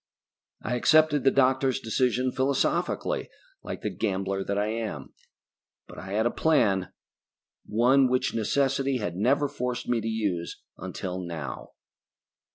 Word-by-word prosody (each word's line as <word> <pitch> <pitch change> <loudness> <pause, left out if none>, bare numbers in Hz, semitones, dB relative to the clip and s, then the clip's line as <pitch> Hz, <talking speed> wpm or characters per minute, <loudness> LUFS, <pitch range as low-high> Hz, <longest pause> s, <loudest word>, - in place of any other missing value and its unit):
I 125 - -2
accepted 155 +1 +4
the 135 - +6
doctors' 130 0 +2
decision 125 +1 0
philosophically, 135 - 0 0.3
like - - -6
the - - -1
gambler 95 -2 -1
that 100 +1 -2
I 105 - +1
am. 115 -1 -5 0.7
But - - -11
I 95 +1 -7
had 110 +2 +1
a 120 - +2
plan: 100 - +2 0.8
One 125 +5 +4
which 130 0 +1
necessity 135 +4 +1
had 90 -7 -3
never 135 +9 +2
forced 125 -2 -4
me 120 -2 +1
to 110 - -4
use 100 -6 -2 0.2
until 95 0 -5
now. 85 -5 -6
120 Hz, 135 wpm, -27 LUFS, 100-135 Hz, 0.8 s, the